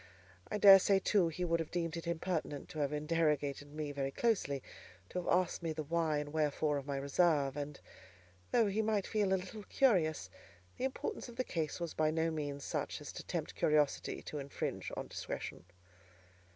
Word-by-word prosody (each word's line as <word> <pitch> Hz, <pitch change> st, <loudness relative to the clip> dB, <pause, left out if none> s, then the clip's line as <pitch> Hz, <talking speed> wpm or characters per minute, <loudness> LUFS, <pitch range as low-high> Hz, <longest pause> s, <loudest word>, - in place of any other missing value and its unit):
I -, -, -1 dB
daresay, 195 Hz, -1 st, +8 dB
too, 195 Hz, -2 st, +3 dB
he 170 Hz, +2 st, -2 dB
would 170 Hz, -1 st, +1 dB
have 165 Hz, -, -3 dB
deemed 165 Hz, -2 st, -2 dB
it 170 Hz, 0 st, -5 dB
impertinent 170 Hz, -4 st, -2 dB
to 155 Hz, -, -6 dB
have 145 Hz, -1 st, +1 dB
interrogated 150 Hz, -2 st, 0 dB
me 150 Hz, -1 st, -4 dB
very 140 Hz, -1 st, -2 dB
closely, 145 Hz, -, 0 dB, 0.5 s
to -, -, -2 dB
have 180 Hz, -, -2 dB
asked 180 Hz, 0 st, +2 dB
me 165 Hz, -2 st, -2 dB
the 155 Hz, 0 st, -3 dB
why 160 Hz, 0 st, +1 dB
and 145 Hz, 0 st, -4 dB
wherefore 150 Hz, -1 st, +1 dB
of 140 Hz, -, -10 dB
my 140 Hz, -1 st, -2 dB
reserve; 140 Hz, 0 st, +2 dB
and, 145 Hz, 0 st, -5 dB, 0.7 s
though 235 Hz, -2 st, +4 dB
he 205 Hz, +2 st, +1 dB
might 215 Hz, -2 st, +1 dB
feel 210 Hz, -3 st, +1 dB
a 190 Hz, -, +4 dB
little 190 Hz, +4 st, -7 dB
curious, 180 Hz, -, +2 dB, 0.5 s
the 255 Hz, -, -1 dB
importance 265 Hz, -1 st, -4 dB
of 240 Hz, -, -11 dB
the 255 Hz, -, 0 dB
case 160 Hz, -8 st, -2 dB
was 170 Hz, -2 st, -3 dB
by 155 Hz, 0 st, +2 dB
no 160 Hz, +1 st, +1 dB
means 145 Hz, -2 st, -4 dB
such -, -, -3 dB
as -, -, -8 dB
to -, -, -7 dB
tempt -, -, -3 dB
curiosity 150 Hz, -2 st, +1 dB
to 150 Hz, -, -5 dB
infringe 140 Hz, 0 st, -4 dB
on -, -, -3 dB
discretion. -, -, -6 dB
160 Hz, 190 wpm, -34 LUFS, 145-185 Hz, 0.7 s, daresay